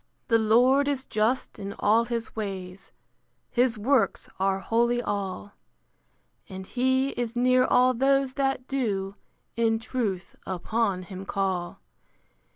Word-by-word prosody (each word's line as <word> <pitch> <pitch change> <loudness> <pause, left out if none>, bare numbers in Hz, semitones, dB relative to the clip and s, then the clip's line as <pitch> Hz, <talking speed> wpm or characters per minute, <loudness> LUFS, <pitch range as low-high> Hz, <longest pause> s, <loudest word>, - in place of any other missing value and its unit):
The 230 -1 +4
Lord 250 +6 +4
is 275 -2 -1
just 220 +5 -1
in 200 0 -5
all 225 +3 +3
his 235 -1 -4
ways: 195 -3 -6 0.6
His 245 -2 +2
works 225 -1 +1
are 190 0 +2
holy 235 +5 +1
all: 200 -2 -4 1.0
And 190 -1 -7
he 260 +4 +1
is 240 -3 -4
near 255 +1 +4
all 250 0 +4
those 270 +1 +2
that 270 -2 -1
do 200 -8 -2 0.4
In 225 -1 +2
truth 220 -6 -3
upon 190 +1 -1
him 185 +1 -8
call. 190 -3 -2
230 Hz, 125 wpm, -26 LUFS, 195-255 Hz, 1.0 s, The